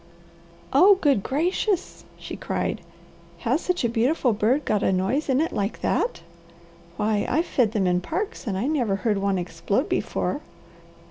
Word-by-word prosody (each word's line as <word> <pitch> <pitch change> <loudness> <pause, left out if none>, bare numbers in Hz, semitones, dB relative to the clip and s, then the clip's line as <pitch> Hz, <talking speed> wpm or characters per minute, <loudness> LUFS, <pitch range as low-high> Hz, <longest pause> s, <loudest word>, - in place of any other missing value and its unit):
"Oh, 375 +9 +7
good 285 - +2
gracious!" 350 - -1
she - - -7
cried. - - -3 0.6
"Has 260 +7 +1
such 360 -5 -1
a - - +3
beautiful 240 +2 +1
bird 240 +8 +1
got 210 -2 +1
a - - +2
noise 210 +12 0
in 265 0 +3
it 320 - 0
like 200 +2 -2
that? 480 - 0 0.8
Why 210 -1 +1
I've 320 +6 +1
fed 230 -9 +1
them 205 -4 +1
in 180 0 +2
parks 345 - -4
and 195 -3 -1
I 205 - -1
never 255 -9 +1
heard 205 +1 0
one 195 -1 0
explode 180 - -1
before." - - -1
240 Hz, 160 wpm, -24 LUFS, 200-305 Hz, 0.8 s, Oh